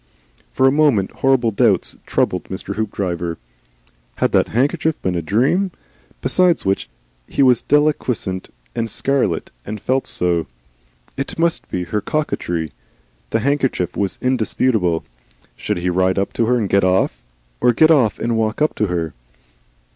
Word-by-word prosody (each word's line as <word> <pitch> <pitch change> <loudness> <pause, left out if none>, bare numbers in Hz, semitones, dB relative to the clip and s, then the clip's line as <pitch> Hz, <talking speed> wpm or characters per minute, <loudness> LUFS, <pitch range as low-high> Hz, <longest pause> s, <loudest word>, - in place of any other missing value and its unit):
For 130 - +2
a - - +5
moment 140 -10 +3
horrible 130 -4 +3
doubts 100 - +2
troubled - - 0
Mr. - - -5
Hoopdriver. 90 -6 -2 0.8
Had - - +1
that - - +3
handkerchief 145 +6 0
been 95 - 0
a 85 - -1
dream? 130 - +1 0.5
Besides 180 -2 +2
which 95 -8 0 0.4
he - - +1
was 125 -3 +5
deliquescent 130 -10 0 0.3
and 115 0 -1
scarlet, 125 -6 0
and 105 +1 -6
felt 130 +5 0
so. 85 -3 0 0.7
It 135 - -4
must 165 0 0
be 90 - -2
her 95 +5 -2
coquetry 85 - -2 0.6
the 115 - 0
handkerchief 135 - 0
was 100 -3 -1
indisputable. 110 -8 +1 0.5
Should - - -2
he 90 +1 -1
ride 95 +1 +2
up 100 - -1
to 115 - +1
her 125 +1 +3
and 110 -4 0
get 100 0 +3
off, 90 -10 +1 0.4
or 125 - +4
get 155 +7 +5
off 130 -9 +3
and 115 -1 -1
ride 110 0 -1
up 150 +1 +2
to 105 - +1
her? 85 -4 -2
110 Hz, 150 wpm, -19 LUFS, 95-135 Hz, 0.8 s, a